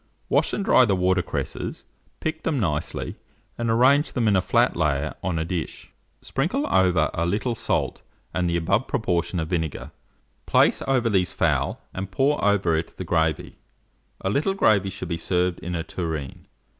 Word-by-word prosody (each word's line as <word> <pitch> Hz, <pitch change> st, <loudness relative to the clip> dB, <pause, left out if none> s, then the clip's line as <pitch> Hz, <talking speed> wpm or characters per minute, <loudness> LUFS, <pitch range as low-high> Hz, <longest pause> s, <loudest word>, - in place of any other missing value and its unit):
Wash -, -, +2 dB
and 200 Hz, -, -2 dB
dry 130 Hz, -, +6 dB
the 105 Hz, -5 st, +2 dB
water 95 Hz, 0 st, +2 dB
cresses, 85 Hz, -, -5 dB, 0.4 s
pick 160 Hz, 0 st, -2 dB
them 150 Hz, -4 st, -1 dB
nicely, 75 Hz, -7 st, -2 dB, 0.4 s
and 120 Hz, -1 st, -2 dB
arrange 130 Hz, +6 st, +4 dB
them 120 Hz, -3 st, +1 dB
in 105 Hz, -, +4 dB
a 95 Hz, -, +4 dB
flat -, -, +2 dB
layer 75 Hz, -2 st, 0 dB
on 90 Hz, -3 st, -1 dB
a 80 Hz, -, -1 dB
dish. 85 Hz, -1 st, -5 dB, 0.3 s
Sprinkle 190 Hz, -, -1 dB
over 90 Hz, -4 st, +3 dB
a 85 Hz, -, -1 dB
little 105 Hz, +8 st, 0 dB
salt -, -, -1 dB, 0.3 s
and 90 Hz, -1 st, 0 dB
the 85 Hz, -, +1 dB
above 95 Hz, +9 st, +1 dB
proportion 90 Hz, -4 st, -1 dB
of 80 Hz, -1 st, -3 dB
vinegar; 80 Hz, -5 st, -3 dB, 0.6 s
place -, -, +4 dB
over 130 Hz, -3 st, +2 dB
these 95 Hz, -5 st, +2 dB
the -, -, -15 dB
fowl, -, -, +1 dB
and 95 Hz, +1 st, -5 dB
pour 135 Hz, +9 st, +1 dB
over 100 Hz, -5 st, +3 dB
it 80 Hz, +1 st, -4 dB
the 95 Hz, -, -5 dB
gravy. 80 Hz, -2 st, -1 dB, 0.6 s
A 95 Hz, -, -1 dB
little 155 Hz, -, +1 dB
gravy 100 Hz, -, +3 dB
should 95 Hz, -1 st, -6 dB
be 85 Hz, -, -1 dB
served 90 Hz, +1 st, 0 dB
in 90 Hz, +1 st, -4 dB
a 80 Hz, -, -2 dB
tureen. 80 Hz, -5 st, -5 dB
95 Hz, 180 wpm, -24 LUFS, 85-115 Hz, 0.6 s, dry